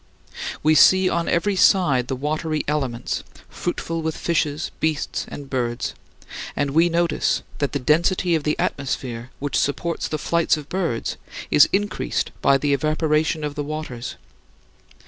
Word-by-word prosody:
We 155 +1 +5
see 185 +3 +6
on 170 0 0
every 195 +4 +1
side 150 - +4
the 130 - -2
watery 155 +3 -2
elements, 135 -5 -1 0.3
fruitful 165 -1 -3
with 160 0 -2
fishes, 155 -2 -1
beasts, 160 -2 -1
and 140 - -8
birds 120 -3 -2 0.6
and 145 -1 0
we 165 +4 +4
notice 170 0 +1 0.2
that 145 -2 -1
the - - +1
density 170 +6 +2
of 160 - +2
the 150 0 0
atmosphere 125 -3 -3
which 145 0 -3
supports 170 +4 -1
the 155 - -2
flights 170 +1 +1
of 150 -1 -9
birds 170 -11 -2 0.3
is 145 - +7
increased 205 +2 -1
by 140 - +5
the 145 +1 +1
evaporation 155 +2 +1
of 150 -1 -2
the 145 - -3
waters. 145 -5 -5
150 Hz, 145 wpm, -22 LUFS, 140-170 Hz, 0.6 s, is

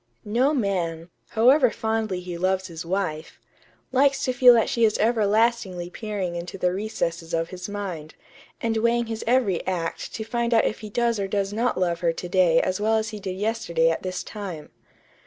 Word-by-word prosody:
"No 240 +7 +2
man, 180 - -2 0.2
however 250 +4 +5
fondly 220 -5 -2
he 180 -1 -6
loves 185 +2 0
his 170 -2 -7
wife, 170 -3 -3 0.5
likes 275 +1 +3
to 255 - 0
feel 250 -1 +7
that 225 - +3
she 235 - 0
is 215 -1 +3
everlastingly 215 -4 +1
peering 200 -5 -4
into 175 +2 -6
the 180 -1 +1
recesses 170 -5 -3
of 165 0 -1
his 180 +1 -7
mind, 185 -7 -6 0.4
and 225 -1 -1
weighing 235 +1 +2
his 225 -1 -5
every 235 -8 +2
act 170 -3 -3
to 220 - -4
find 235 +1 0
out 225 - +4
if - - -1
he 215 - -8
does 235 0 0
or 195 - -1
does 195 0 -1
not 235 -1 0
love 170 -2 0
her 170 -1 +1
to 180 - -6
day 175 -3 +4
as 185 +2 -1
well 220 +1 +2
as 220 0 -1
he 215 -2 -7
did 190 -2 -5
yesterday 190 -6 +1
at 165 - -3
this 185 -1 -4
time.... 190 -8 -7
200 Hz, 195 wpm, -24 LUFS, 180-225 Hz, 0.5 s, feel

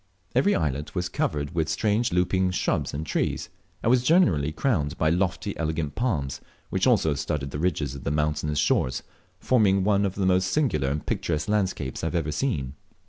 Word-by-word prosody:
Every 135 +11 +3
islet 75 0 -2
was 90 -1 -1
covered 75 +2 -2
will 80 -2 0
strange 105 +8 +1
looping 90 +1 +2
shrubs 90 - -1
and 75 +2 -4
trees, - - -1 0.3
and 115 - +3
was 125 -1 +4
generally 95 - +3
crowned 80 - 0
by 80 0 +2
lofty 90 +3 0
and - - -10
elegant 80 -2 -2
palms, 80 - -1 0.3
which - - +1
also 80 - +3
studded 70 -1 -3
the 70 - -4
ridges 80 -5 -1
of 70 - -8
the - - -1
mountainous 75 0 0
shores, 65 -3 +1 0.4
forming 100 -6 +3
one 100 0 +3
of 95 -2 -1
the 95 - 0
most 95 0 +3
singular 90 - +1
and 75 +2 -3
picturesque 75 +1 -1
landscapes 95 -10 -1
I - - +1
have 80 - -3
ever 80 -3 0
seen. 75 - -1
80 Hz, 190 wpm, -26 LUFS, 75-100 Hz, 0.4 s, was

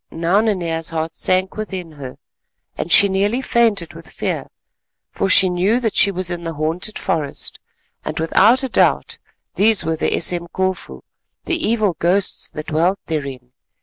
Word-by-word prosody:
Now 170 +5 +1
Nanea's 170 -7 -1
heart 160 0 -3
shrank 185 +2 0
within 190 -6 -6
her, 135 -4 -9 0.6
and 170 - -5
she 200 - +7
nearly 200 +5 0
fainted 225 -9 +1
with - - -12
fear, - - -4 0.6
for 195 - -1
she 190 0 +6
knew 185 +6 +1
that 225 -4 -1
she - - +4
was 185 -2 -1
in 175 -1 -4
the 165 -1 -5
haunted 165 +7 -2
forest, 150 -4 -3 0.4
and - - -5
without 215 +10 +4
a 265 - -2
doubt - - +1 0.3
these 210 -3 +3
were 160 0 0
the - - 0
Esemkofu, 175 - -2 0.4
the - - 0
evil 215 -6 +1
ghosts 185 +3 +1
that 155 - -7
dwelt 170 +5 +1
therein. 135 -5 -5
180 Hz, 155 wpm, -19 LUFS, 165-200 Hz, 0.6 s, she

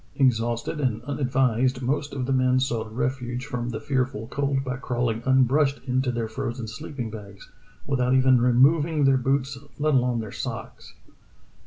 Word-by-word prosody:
Exhausted 120 +1 +1
and 120 -5 -1
unadvised, 130 -2 0
most 140 +3 -1
of 130 -2 -3
the 135 - 0
men 130 0 +3
sought 115 -4 -2
ref 130 +3 -1
uge 125 0 -5
from 125 -4 -4
the 110 -2 -4
fearful 130 -5 -1
cold 140 -1 -1
by 130 -2 -3
crawling 120 -3 -2
unbrushed 135 +2 +3
into 130 0 0
their 120 -2 -2
frozen 115 +1 -4
sleeping 115 +2 -6
bags, 100 -2 -11 0.3
without 130 -2 +1
even 130 -1 +5
removing 145 +5 +4
their 135 -1 +5
boots 135 +1 -1 0.2
let 150 +1 +1
alone 125 -2 +2
their 110 -3 -5
socks. - - -7
125 Hz, 160 wpm, -25 LUFS, 120-135 Hz, 0.3 s, even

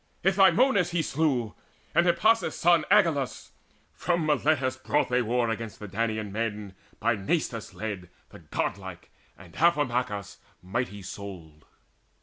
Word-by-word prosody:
Itymoneus 195 +1 +4
he 170 -2 0
slew, 135 -8 0 0.4
and 175 - +3
Hippasus' 220 +6 +3
son 170 -2 +4
Agelaus: 165 -10 +2 0.4
from 175 -2 0
Miletus 145 -3 +1
brought 145 +3 0
they 125 0 +2
war 120 0 0
Against 115 -1 -5
the 105 - -8
Danaan 110 +1 -2
men 105 -2 -3 0.3
by 115 +1 +2
Nastes 115 - -2
led, 100 -5 -5 0.2
The - - -13
god 100 - -3
like, 95 -3 -10 0.3
and 90 -4 -15
Amphimachus 125 - 0 0.3
mighty 100 +1 -3
souled. 90 -6 -9
120 Hz, 130 wpm, -27 LUFS, 105-160 Hz, 0.4 s, Itymoneus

